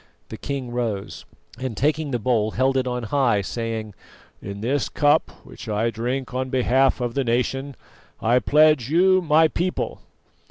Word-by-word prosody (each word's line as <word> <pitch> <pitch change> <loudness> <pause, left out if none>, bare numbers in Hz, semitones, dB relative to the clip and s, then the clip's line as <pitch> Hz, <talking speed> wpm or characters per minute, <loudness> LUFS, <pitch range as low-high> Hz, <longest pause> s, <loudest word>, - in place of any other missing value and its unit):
The - - -7
king 135 -4 -5
rose, 115 -5 -4 0.3
and 130 -5 -4
taking 150 +2 0
the 125 - -1
bowl, 110 -2 +1
held 130 +4 +1
it 130 -1 0
on 125 -1 -3
high, 120 -3 +1
saying: 110 0 -4 0.5
"In 100 +1 -7
this 130 +4 -1
cup, 145 +1 +2 0.2
which - - -10
I 110 +2 0
drink 125 +3 -3
on 130 0 -2
behalf 130 +1 +2
of 120 -1 -2
the 140 - 0
nation, 130 +3 -1 0.4
I 120 +3 +3
pledge 150 -3 +3
you, 185 +4 +4
my 160 -1 +4
people." 180 +3 -3
130 Hz, 160 wpm, -23 LUFS, 115-140 Hz, 0.5 s, you